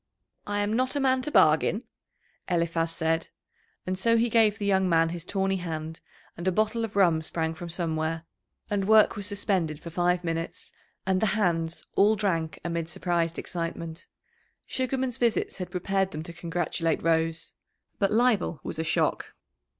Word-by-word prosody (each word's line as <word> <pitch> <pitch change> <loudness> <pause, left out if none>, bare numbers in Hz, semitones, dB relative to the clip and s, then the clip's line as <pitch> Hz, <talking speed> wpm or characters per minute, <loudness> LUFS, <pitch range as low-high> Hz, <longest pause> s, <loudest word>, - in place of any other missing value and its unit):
"I 205 0 0
am 205 +1 0
not 255 +4 +1
a - - +1
man 260 -1 +2
to 260 - -3
bargain," - - +4 0.7
Eliphaz 170 -1 +1
said, 165 0 0 0.6
and 185 - -1
so 230 +5 +3
he 235 +1 +2
gave 220 -2 +4
the 205 - -3
young 190 -2 +2
man 165 -1 +4
his 170 0 -5
tawny 195 -1 0
hand, 160 -2 -5 0.4
and 170 +2 -5
a - - +4
bottle 215 +4 +1
of 220 -3 -4
rum 170 -5 +4
sprang 160 0 -2
from 170 +1 -8
somewhere, 165 -1 -2 0.4
and 200 -2 -1
work 220 -1 +6
was 205 -2 -1
suspended 190 -7 0
for 170 - -9
five 175 +1 +1
minutes, 165 0 -4 0.3
and 190 -1 +1
the 220 - +3
"hands" 165 -5 0
all 210 +2 +5
drank 170 -6 -1
amid 170 -1 -2
surprised 170 -2 -1
excitement. 165 -1 -5 0.6
Sugarman's 260 -1 -2
visits 235 -2 +1
had 180 - -4
prepared 190 +1 0
them 155 -4 -6
to 170 0 -8
congratulate 165 -1 -1
Rose. 165 0 0 0.5
But 195 - +2
Leibel 220 -7 +2
was 160 - -5
a - - 0
shock. 165 - 0
175 Hz, 165 wpm, -27 LUFS, 165-205 Hz, 0.7 s, work